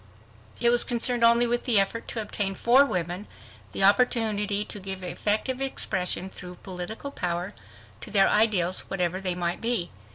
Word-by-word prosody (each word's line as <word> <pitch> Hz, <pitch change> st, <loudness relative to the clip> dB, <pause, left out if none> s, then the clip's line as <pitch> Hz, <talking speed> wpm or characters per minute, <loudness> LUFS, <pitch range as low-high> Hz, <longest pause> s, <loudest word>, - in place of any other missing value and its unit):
It 235 Hz, 0 st, +3 dB
was 240 Hz, -, +5 dB
concerned 240 Hz, 0 st, +2 dB
only 235 Hz, +1 st, +5 dB
with 240 Hz, 0 st, -2 dB
the 230 Hz, -5 st, +4 dB
effort 215 Hz, +4 st, -2 dB
to 225 Hz, -, -3 dB
obtain 200 Hz, -2 st, -3 dB
for 245 Hz, +7 st, +4 dB
women 180 Hz, -4 st, -4 dB, 0.4 s
the -, -, -2 dB
opportunity 210 Hz, -2 st, +2 dB
to 210 Hz, -, -6 dB
give 190 Hz, -1 st, -6 dB
effective 215 Hz, +8 st, -1 dB
expression, 190 Hz, -8 st, 0 dB
through 180 Hz, -1 st, -10 dB
political 195 Hz, +9 st, -6 dB
power, 180 Hz, -2 st, -4 dB, 0.5 s
to -, -, -9 dB
their 195 Hz, -2 st, +4 dB
ideals, 200 Hz, -5 st, +2 dB
whatever 180 Hz, 0 st, -2 dB
they 185 Hz, -2 st, -1 dB
might 175 Hz, -1 st, -3 dB
be. 230 Hz, -7 st, -1 dB
205 Hz, 160 wpm, -25 LUFS, 180-235 Hz, 0.5 s, was